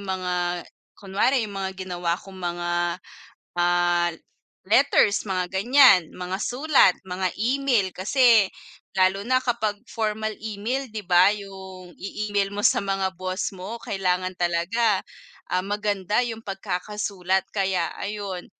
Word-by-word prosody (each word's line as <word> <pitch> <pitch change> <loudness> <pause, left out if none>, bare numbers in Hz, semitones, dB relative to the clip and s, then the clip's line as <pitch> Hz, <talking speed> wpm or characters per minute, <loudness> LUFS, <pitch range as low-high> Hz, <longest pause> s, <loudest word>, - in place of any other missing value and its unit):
mga 180 -2 -2 0.3
kunwari 210 +6 +1
'yung 210 - -7
mga 190 0 -4
ginawa 175 -2 -2
kong 190 0 -13
mga, 175 0 -3 0.8
ah, 175 0 +2 0.6
letters 220 -2 +4
mga 185 -2 -1
ganiyan, 235 +1 +6
mga 185 +1 -5
sulat, 270 - +4
mga 185 0 -2
email. 245 -3 +1
Kasi 220 0 +4 0.5
lalo 190 +1 +3
na 255 +4 +2
kapag 220 -4 -1
formal 215 -1 -2
email 225 +5 -3
'di 215 -3 -7
ba, 180 +2 +6
'yung 190 -3 -8
i-email 200 0 -2
mo 205 +1 +2
sa - - +2
mga 195 -1 -1
boss 185 +2 -3
mo, 195 +5 -7
kailangan 185 -3 -1
talaga, 180 +5 +1 0.5
ah, 185 - +2
maganda 205 -1 -1
'yung 230 -2 -1
pagkakasulat. 190 -1 -2
Kaya 190 -2 0
ayun, 200 -3 -5
195 Hz, 125 wpm, -24 LUFS, 185-215 Hz, 0.8 s, ganiyan